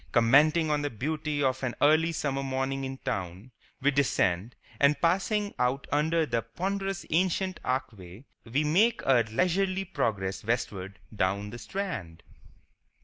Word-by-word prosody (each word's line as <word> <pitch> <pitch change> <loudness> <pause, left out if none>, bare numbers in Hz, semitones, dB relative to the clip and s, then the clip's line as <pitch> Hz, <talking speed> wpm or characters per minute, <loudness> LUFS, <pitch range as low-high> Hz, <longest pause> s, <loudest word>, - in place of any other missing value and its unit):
Commenting 150 +7 +4
on 150 -1 +1
the 145 - -1
beauty 150 +4 -2
of 130 -1 +1
an 130 -2 -2
early 155 +3 +4
summer 140 -4 -2
morning 135 0 -2
in 135 0 -5
town, 100 -3 -5 0.3
we 145 +2 +3
descend, 115 -6 +1 0.2
and 140 +1 +4
passing 200 +4 +1
out 125 +2 0
under 160 +2 +2
the 120 -4 -1
ponderous 195 - -3
ancient 185 +2 +1
archway, 110 -5 -4 0.2
we 130 +6 0
make 210 +10 +2
our 130 -3 +5
leisurely 185 - 0
progress 100 - -2
westward 100 -4 -3 0.2
down 100 +1 -1
the 120 - -8
Strand. 115 - -5
135 Hz, 140 wpm, -28 LUFS, 115-165 Hz, 0.3 s, our